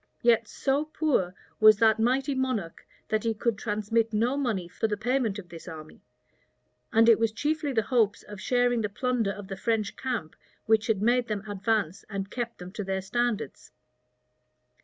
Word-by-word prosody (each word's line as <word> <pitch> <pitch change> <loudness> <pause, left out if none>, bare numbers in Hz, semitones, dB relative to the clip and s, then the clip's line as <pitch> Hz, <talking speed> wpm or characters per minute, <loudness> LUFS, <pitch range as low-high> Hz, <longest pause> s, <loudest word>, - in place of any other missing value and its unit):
Yet 230 -2 +4
so 280 +2 0
poor 295 - 0 0.2
was 215 -1 +8
that 220 0 +4
mighty 265 +5 +1
monarch, 255 -10 -3 0.2
that 215 -1 0
he 225 -1 0
could 230 +1 0
transmit 215 +2 0
no 230 +5 +1
money 225 -11 -1
for 200 +6 -2
the 210 -1 -2
payment 235 -2 0
of 185 -4 -9
this 165 0 -11
army; 155 -3 -10 0.9
and 225 0 +5
it 230 -2 +6
was 225 -1 +2
chiefly 295 +4 -1
the 225 -4 +1
hopes 220 -4 +1
of 205 -2 -10
sharing 245 0 +2
the 210 - -1
plunder 235 -1 0
of 200 0 -8
the 195 - -5
French 215 +1 -1
camp 240 -12 -4 0.3
which 220 0 +3
had 210 -3 +1
made 240 +1 +3
them 210 -1 -4
advance 205 -3 -1
and 195 -1 -4
kept 235 -1 -4
them 180 +1 -9
to 210 +1 -5
their 190 0 -2
standards. 230 - -2
220 Hz, 180 wpm, -27 LUFS, 200-245 Hz, 0.9 s, was